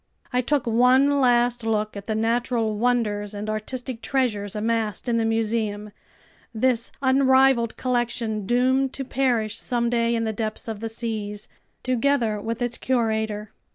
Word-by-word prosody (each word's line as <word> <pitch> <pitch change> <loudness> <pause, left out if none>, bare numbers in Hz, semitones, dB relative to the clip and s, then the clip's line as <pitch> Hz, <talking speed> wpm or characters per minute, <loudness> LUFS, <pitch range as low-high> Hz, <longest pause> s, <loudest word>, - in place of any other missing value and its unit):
I 250 - +3
took 280 +1 0
one 255 +5 +4
last 240 -1 +3
look 215 -1 -1
at 200 0 -8
the 220 - -1
natural 230 0 0
wonders 210 -3 0
and 205 +1 -5
artistic 235 +3 -4
treasures 215 -8 -1
amassed 220 0 -1
in 235 -1 +1
the 225 - +1
museum, 220 -2 -1 0.6
this 235 0 +1
unrivaled 260 -3 +4
collection 235 -4 -1
doomed 260 +3 +2
to 275 - -4
perish 240 -5 0
someday 235 -1 0
in 230 - 0
the 220 -1 -1
depths 215 +1 -4
of 220 -2 -4
the 225 +1 -4
seas, 215 -2 -4 0.4
together 250 -4 +1
with 230 +3 -3
its 240 -1 -2
curator. 220 -4 -1
230 Hz, 145 wpm, -24 LUFS, 215-250 Hz, 0.6 s, one